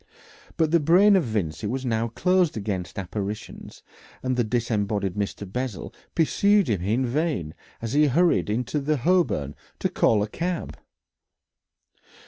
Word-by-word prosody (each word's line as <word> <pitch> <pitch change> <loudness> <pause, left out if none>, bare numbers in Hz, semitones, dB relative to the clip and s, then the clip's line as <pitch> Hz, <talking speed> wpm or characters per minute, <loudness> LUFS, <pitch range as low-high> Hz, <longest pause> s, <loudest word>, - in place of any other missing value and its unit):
But 160 -1 +2
the 170 - +5
brain 185 +7 +5
of 185 - +3
Vincey 100 -6 -2
was 130 +4 -3
now 115 -1 0
closed 175 +6 +1
against 100 -4 -4
apparitions, 100 +2 -6 0.4
and 130 0 0
the 125 - +2
disembodied 105 -4 -1
Mr. 100 0 -3
Bessel 125 +2 -5 0.2
pursued 200 +3 +3
him 100 -6 0
in 110 +8 0
vain 125 - -1 0.3
as 115 +1 -3
he 150 +1 +4
hurried 165 -2 +2
out - - +1
into 145 +5 -1
Holborn 120 - +1 0.2
to - - -1
call 105 -2 +2
a - - -2
cab. 175 +8 -3
120 Hz, 140 wpm, -25 LUFS, 105-155 Hz, 0.4 s, the